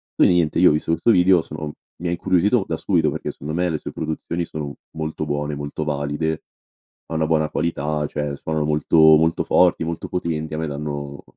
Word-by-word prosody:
Quindi - - +5
niente, 85 -2 +2
io 90 - +7
ho - - +3
visto 75 +2 -1
questo 85 +8 +3
video, 90 -2 +5
sono 75 -1 -6 0.3
mi 90 - -2
ha - - -1
incuriosito 95 +5 +2
da - - -2
subito - - +2
perché, - - -4
secondo 75 +2 -7
me, 90 +2 +1
le 80 - -1
sue - - -7
produzioni 80 +2 -3
sono 75 -3 -6 0.2
molto 80 0 -3
buone, 75 0 -2
molto 75 +1 -4
valide, 75 +2 -2 0.6
ha - - -7
una 80 0 +1
buona 80 -1 +1
qualità, 75 -2 -1
cioè 75 -1 -3
suonano 80 +1 -2
molto, 75 +2 +1 0.2
molto 80 +1 +1
forti, 90 -2 +3
molto 85 0 -4
potenti, 80 -3 -3
a - - -4
me 80 - -2
danno 70 -1 -5
80 Hz, 200 wpm, -22 LUFS, 75-85 Hz, 0.6 s, io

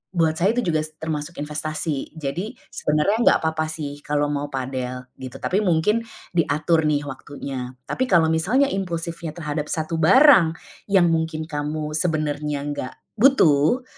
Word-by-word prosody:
buat 160 -2 +2
saya 190 +5 +3
tuh 245 - +1
juga 160 -2 +2
s 155 0 -9
termasuk 160 +1 -4
investasi. 155 0 -3
Jadi 160 +7 -4 0.2
sebenarnya 150 +7 +1
nggak - - +7
apa 160 - +2
apa 155 0 0
sih 150 -2 -6
kalau 145 0 0
mau 145 0 -2
padel 130 -2 -4 0.2
gitu, 130 -1 -8
tapi 195 - 0
mungkin 185 +5 +2 0.3
diatur 160 -1 +1
nih 145 -1 +1
waktunya. 130 -2 -6
Tapi 260 - -1
kalau 170 -7 +4
misalnya 215 +13 +2
impulsifnya 170 -3 -3
terhadap 150 -2 -3
satu 160 +1 -2
barang, 190 - +6 0.3
yang 190 -3 +4
mungkin 160 -1 -1
kamu 150 0 -4
sebenarnya 150 -3 -1
nggak 130 -3 -5 0.3
butuh, 240 - +4
155 Hz, 150 wpm, -23 LUFS, 145-170 Hz, 0.3 s, nggak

